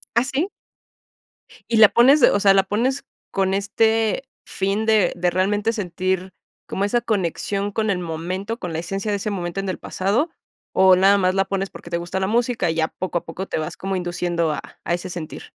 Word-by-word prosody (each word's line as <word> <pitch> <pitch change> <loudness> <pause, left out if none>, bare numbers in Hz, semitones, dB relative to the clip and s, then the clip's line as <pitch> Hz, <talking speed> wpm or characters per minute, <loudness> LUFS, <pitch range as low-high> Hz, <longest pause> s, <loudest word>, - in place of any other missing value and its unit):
¿Ah, 235 - +4
sí? 275 +7 -1 1.2
¿Y 230 - +2
la 215 -2 +9
pones, 255 +8 +5
o - - +5
sea, 195 -1 +5
la 195 - +4
pones 240 +8 -1 0.3
con 190 0 0
este 220 +4 +1 0.2
fin 200 +3 -1
de 215 -5 +3
de 175 0 +1
realmente 200 +4 +1
sentir 185 -2 -2 0.3
como 195 - -2
esa 240 +4 +1
conexión 200 -1 -1
con 220 +1 -1
el 185 -3 +1
momento, 180 +6 -4
con 175 -3 -5
la 160 - -2
esencia 195 +4 -3
de 205 - 0
ese 210 - -3
momento 175 -1 -3
en 195 - -3
el 185 - -4
pasado, 210 - 0 0.4
o 190 0 +6
nada 195 +2 +5
más 185 0 +1
la 195 - +2
pones 195 0 -2
porque - - -12
te 170 - -1
gusta 175 +2 -3
la 190 - 0
música, 235 -2 +1
y 160 - -1
ya 160 -1 +1
poco 180 -2 -3
a - - -26
poco 175 +4 -5
te - - -2
vas 155 - -5
como 195 0 -3
induciendo 175 -2 -1
a 150 - -3 0.2
a 170 - -1
ese 175 +1 -3
sentir? 170 -3 -7
195 Hz, 210 wpm, -22 LUFS, 180-215 Hz, 1.2 s, la